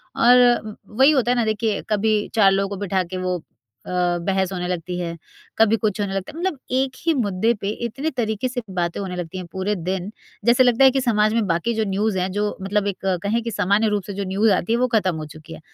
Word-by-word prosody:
और 245 Hz, +2 st, +6 dB, 0.3 s
व 215 Hz, -1 st, -7 dB, 0.2 s
वही 270 Hz, +3 st, +7 dB
होता 255 Hz, -5 st, +2 dB
है -, -, +2 dB
ना 235 Hz, -, +2 dB
देखिए 215 Hz, -1 st, -1 dB
कभी 215 Hz, 0 st, +2 dB, 0.2 s
4 200 Hz, -3 st, +5 dB
लोगों 195 Hz, 0 st, 0 dB
को -, -, -8 dB
बिठा 190 Hz, 0 st, 0 dB
के 180 Hz, +1 st, -6 dB
वो 180 Hz, -2 st, -1 dB, 0.4 s
अ, -, -, -9 dB, 0.4 s
बहस 190 Hz, -1 st, 0 dB
होने 180 Hz, -1 st, -3 dB
लगती 180 Hz, 0 st, -3 dB
है, 170 Hz, -1 st, -4 dB, 0.4 s
कभी 225 Hz, 0 st, +4 dB
कुछ 210 Hz, -1 st, -1 dB
होने 200 Hz, -1 st, -2 dB
लगता 195 Hz, -1 st, -4 dB
है। 320 Hz, -, -9 dB
मतलब 355 Hz, -4 st, -1 dB
एक 260 Hz, +1 st, +1 dB
ही 330 Hz, -, +3 dB
मुद्दे 225 Hz, -3 st, +1 dB
पे 200 Hz, -, -2 dB, 0.2 s
इतने 270 Hz, +7 st, -3 dB
तरीके 220 Hz, 0 st, -1 dB
से 250 Hz, 0 st, -4 dB, 0.2 s
बातें 170 Hz, -1 st, -1 dB
होने 190 Hz, -2 st, -4 dB
लगती 175 Hz, 0 st, -5 dB
हैं 185 Hz, -, -5 dB
पूरे 190 Hz, +4 st, -1 dB
दिन, 185 Hz, +1 st, -3 dB, 0.4 s
जैसे 240 Hz, +2 st, +5 dB
लगता 245 Hz, +1 st, +4 dB
है 265 Hz, -, +8 dB
कि 270 Hz, +1 st, 0 dB
समाज 215 Hz, -3 st, +2 dB
में 225 Hz, -3 st, +1 dB
बाकी 175 Hz, +7 st, 0 dB
जो 220 Hz, -1 st, 0 dB
न्यूज़ 200 Hz, +1 st, 0 dB
हैं 185 Hz, +1 st, -1 dB
जो 205 Hz, +2 st, -1 dB, 0.2 s
मतलब 205 Hz, +1 st, 0 dB
एक 200 Hz, -, -2 dB, 0.3 s
कहें 220 Hz, +4 st, 0 dB
कि 230 Hz, -, -3 dB
सामान्य 205 Hz, +2 st, +2 dB
रूप 205 Hz, -, -2 dB
से 200 Hz, -, -7 dB
जो 200 Hz, +1 st, -3 dB
न्यूज़ 205 Hz, +3 st, +2 dB
आती 225 Hz, -, -1 dB
हैं 235 Hz, -, +1 dB
वो 255 Hz, -, +2 dB
खत्म 190 Hz, -5 st, +1 dB
हो 155 Hz, -1 st, -5 dB
चुकी 160 Hz, +1 st, -11 dB
है। -, -, -10 dB
205 Hz, 250 wpm, -22 LUFS, 185-230 Hz, 0.4 s, है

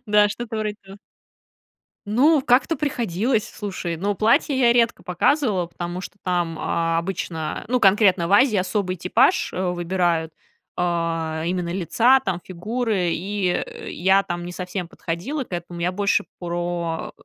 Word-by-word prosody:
Да, 210 Hz, 0 st, +5 dB
что-то 225 Hz, +1 st, -5 dB
вроде 215 Hz, -1 st, -2 dB
того. 195 Hz, +1 st, -13 dB, 1.1 s
Ну, 270 Hz, +9 st, +4 dB
как-то 260 Hz, +6 st, +3 dB
приходилось, 235 Hz, -, 0 dB
слушай, 185 Hz, -5 st, -5 dB
ну, 200 Hz, +4 st, -1 dB
платье 230 Hz, +6 st, +2 dB
я 240 Hz, -2 st, +5 dB
редко 235 Hz, -1 st, +2 dB
показывала, 195 Hz, -, +1 dB
потому 175 Hz, +1 st, -5 dB
что 205 Hz, -, -9 dB
там, 175 Hz, -3 st, -1 dB
а, 165 Hz, 0 st, 0 dB
обычно, 165 Hz, -3 st, -3 dB
ну, 250 Hz, +1 st, +1 dB
конкретно 195 Hz, -4 st, +4 dB
в -, -, -4 dB
Азии, 220 Hz, +3 st, +5 dB
особый 185 Hz, 0 st, -1 dB
типаж, 220 Hz, -, +2 dB
э, 185 Hz, -, -2 dB
выбирают, 175 Hz, -2 st, 0 dB, 0.4 s
а, 165 Hz, -2 st, -1 dB
именно 175 Hz, 0 st, -1 dB
лица 230 Hz, +8 st, +4 dB
там, 190 Hz, -8 st, -2 dB
фигуры. 205 Hz, +1 st, -1 dB
И, 195 Hz, +3 st, -2 dB
э, -, -, -4 dB
я 190 Hz, +3 st, +3 dB
там 175 Hz, -1 st, -4 dB
не 175 Hz, -, -6 dB
совсем 180 Hz, 0 st, -4 dB
подходила 185 Hz, -, -4 dB
к -, -, -24 dB
этому. 175 Hz, 0 st, -5 dB
Я 175 Hz, +1 st, +1 dB
больше 200 Hz, +2 st, +1 dB, 0.2 s
про, 175 Hz, -1 st, -3 dB
185 Hz, 150 wpm, -23 LUFS, 175-220 Hz, 1.1 s, Да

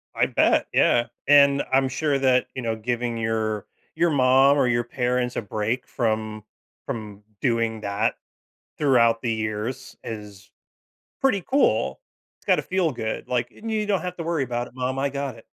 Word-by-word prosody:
I -, -, +3 dB
bet. -, -, +2 dB
Yeah. 120 Hz, -1 st, +3 dB, 0.2 s
And 140 Hz, -1 st, +6 dB
I'm 135 Hz, 0 st, +3 dB
sure 140 Hz, +1 st, 0 dB
that, 130 Hz, -1 st, +3 dB
you 130 Hz, -, -3 dB
know, 115 Hz, -1 st, -1 dB
giving 120 Hz, +1 st, -2 dB
your 110 Hz, -2 st, -1 dB, 0.3 s
your 170 Hz, +1 st, +2 dB
mom 135 Hz, 0 st, +5 dB
or 130 Hz, -, +3 dB
your 120 Hz, 0 st, +1 dB
parents 125 Hz, 0 st, -1 dB
a -, -, -1 dB
break 110 Hz, +4 st, -3 dB
from 110 Hz, -2 st, -2 dB, 0.4 s
from 105 Hz, -5 st, -6 dB, 0.2 s
doing 115 Hz, -3 st, 0 dB
that 105 Hz, +2 st, 0 dB, 0.6 s
throughout 120 Hz, -5 st, +3 dB
the 115 Hz, -2 st, 0 dB
years 110 Hz, +2 st, -4 dB
is 105 Hz, -2 st, -8 dB, 0.7 s
pretty 220 Hz, -8 st, +2 dB
cool. 275 Hz, -, +1 dB, 0.4 s
It's -, -, -30 dB
gotta -, -, +3 dB
feel 185 Hz, -3 st, 0 dB
good. 110 Hz, -3 st, -4 dB
Like, 120 Hz, -1 st, -1 dB
"And 225 Hz, 0 st, -8 dB
you 215 Hz, -1 st, 0 dB
don't 200 Hz, -2 st, +1 dB
have 180 Hz, 0 st, -5 dB
to 170 Hz, -, -4 dB
worry 165 Hz, -3 st, -1 dB
about 120 Hz, 0 st, -3 dB
it, -, -, -20 dB
mom. 130 Hz, +1 st, -2 dB
I 140 Hz, +1 st, +1 dB
got 140 Hz, -2 st, -4 dB
it." 115 Hz, -, -15 dB
125 Hz, 175 wpm, -24 LUFS, 110-140 Hz, 0.7 s, And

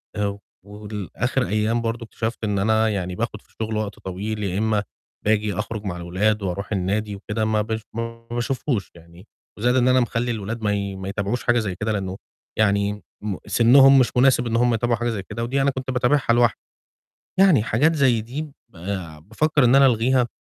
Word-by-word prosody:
آآ 100 Hz, -1 st, -2 dB, 0.3 s
ولآخِر 105 Hz, +4 st, -3 dB
أيام 110 Hz, +3 st, 0 dB
برضه 115 Hz, 0 st, -3 dB
اكتشفت 115 Hz, +1 st, -4 dB
إن 105 Hz, -2 st, 0 dB
أنا 110 Hz, +2 st, +2 dB
يعني 90 Hz, -3 st, -3 dB
باخُد -, -, -3 dB
في -, -, -31 dB
الشُغل 110 Hz, 0 st, -4 dB
وقت 105 Hz, -2 st, -4 dB
طويل 105 Hz, +3 st, -4 dB
يا 95 Hz, -1 st, -2 dB
إمّا 105 Hz, -1 st, +1 dB, 0.4 s
باجي 105 Hz, -1 st, +1 dB
أخرُج 105 Hz, +2 st, -4 dB
مع 90 Hz, -3 st, -3 dB
الولاد 95 Hz, +5 st, 0 dB
وأروح 100 Hz, +2 st, -4 dB
النادي 100 Hz, +2 st, -1 dB
وكده 105 Hz, +2 st, -3 dB
ما 110 Hz, 0 st, +1 dB
بش 110 Hz, +1 st, -3 dB
ما 115 Hz, +1 st, -6 dB
باشوفهوش 120 Hz, -2 st, -2 dB
يعني، 85 Hz, +4 st, -16 dB, 0.3 s
وزائد 120 Hz, +4 st, +2 dB
إن 125 Hz, -1 st, +3 dB
أنا 130 Hz, 0 st, +5 dB
مخلّي 120 Hz, 0 st, 0 dB
الأولاد 115 Hz, +1 st, -4 dB
ما 105 Hz, -1 st, +1 dB
ي 100 Hz, -1 st, -3 dB
ما 95 Hz, 0 st, -6 dB
يتابعوش 100 Hz, +4 st, -2 dB
حاجة 120 Hz, 0 st, +3 dB
زي 100 Hz, -5 st, -3 dB
كده، 105 Hz, +4 st, -2 dB
لإنّه 95 Hz, -2 st, -3 dB, 0.4 s
يعني 100 Hz, -1 st, +1 dB, 0.2 s
م 105 Hz, -3 st, -3 dB
سِنُّهم 135 Hz, +3 st, +6 dB
مش 125 Hz, -, +3 dB
مناسب 125 Hz, -1 st, +4 dB
إن 115 Hz, -, -1 dB
هم 120 Hz, +1 st, +3 dB
يتابعوا 120 Hz, +1 st, +1 dB
حاجة 120 Hz, +1 st, -1 dB
زي 105 Hz, -4 st, -3 dB
كده، 115 Hz, +4 st, -5 dB
ودي 135 Hz, +4 st, 0 dB
أنا 140 Hz, +1 st, +2 dB
كنت 130 Hz, 0 st, -4 dB
باتابعها 125 Hz, +2 st, +1 dB
لوحدي. 120 Hz, -1 st, +3 dB, 0.8 s
يعني 185 Hz, -, +6 dB
حاجات 135 Hz, +9 st, +2 dB
زي 130 Hz, -6 st, +3 dB
دي 125 Hz, +7 st, -5 dB
ب 150 Hz, -3 st, -9 dB, 0.8 s
بافّكر 150 Hz, +5 st, +2 dB
إن 120 Hz, +1 st, +5 dB
أنا 135 Hz, 0 st, +7 dB
ألغيها، 125 Hz, +1 st, +3 dB
110 Hz, 190 wpm, -23 LUFS, 100-120 Hz, 0.8 s, أنا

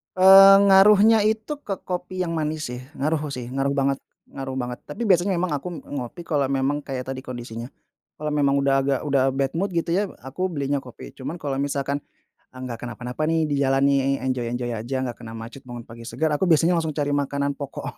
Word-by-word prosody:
Eee, 195 Hz, +1 st, +9 dB
ngaruhnya 210 Hz, +3 st, +6 dB
itu 220 Hz, +7 st, 0 dB
ke 195 Hz, -2 st, -4 dB
kopi 180 Hz, 0 st, -4 dB
yang 170 Hz, -2 st, -1 dB
manis, 155 Hz, -1 st, -2 dB
sih, 125 Hz, +1 st, -7 dB, 0.2 s
ngaruh, 150 Hz, 0 st, -1 dB
sih, 125 Hz, -3 st, -5 dB
ngaruh 135 Hz, +2 st, -1 dB
banget 140 Hz, -1 st, +1 dB, 0.3 s
ngaruh 135 Hz, -1 st, -5 dB
banget. 125 Hz, -1 st, -4 dB
Tapi 235 Hz, -, -5 dB
biasanya 185 Hz, 0 st, +3 dB
memang 180 Hz, -1 st, -1 dB
aku 145 Hz, +6 st, -5 dB, 0.2 s
ngopi 140 Hz, +5 st, -6 dB
kalau 145 Hz, -3 st, +1 dB
memang 135 Hz, +2 st, 0 dB
kayak 130 Hz, -2 st, -4 dB
tadi 135 Hz, 0 st, -4 dB
kondisinya, 120 Hz, -2 st, -7 dB, 0.5 s
kalau 150 Hz, -, -4 dB
memang 140 Hz, -2 st, +2 dB
udah 140 Hz, 0 st, +2 dB
agak 135 Hz, -1 st, +1 dB
udah 135 Hz, -1 st, +2 dB
bad 135 Hz, 0 st, -1 dB
mood, 195 Hz, +3 st, -1 dB
gitu, 170 Hz, 0 st, 0 dB
ya, 200 Hz, -, +2 dB, 0.2 s
aku 140 Hz, +9 st, -3 dB
belinya 140 Hz, -2 st, -1 dB
kopi, 125 Hz, -, -11 dB
cuman 140 Hz, +5 st, -6 dB
kalau 140 Hz, -3 st, -3 dB
misalkan 140 Hz, 0 st, -1 dB, 0.6 s
enggak 130 Hz, -3 st, -7 dB
kenapa-napa, 125 Hz, +4 st, -6 dB
nih, 160 Hz, -1 st, +2 dB
di -, -, +1 dB
jalan, 135 Hz, 0 st, +2 dB
nih, 135 Hz, 0 st, +2 dB
enjoy-enjoy 120 Hz, -1 st, -2 dB
aja, 120 Hz, +5 st, -4 dB
enggak 125 Hz, -2 st, -4 dB
kena 115 Hz, -1 st, -9 dB
macet, 115 Hz, +4 st, -9 dB
bangun 120 Hz, -1 st, -7 dB
pagi 115 Hz, +1 st, -11 dB
segar, 160 Hz, 0 st, -1 dB
aku 165 Hz, +6 st, 0 dB
biasanya 165 Hz, +2 st, +4 dB
langsung 160 Hz, -1 st, -1 dB
cari 145 Hz, -1 st, -1 dB
makanan 140 Hz, 0 st, -1 dB
pokok, 140 Hz, -, -6 dB
140 Hz, 195 wpm, -23 LUFS, 130-165 Hz, 0.6 s, Eee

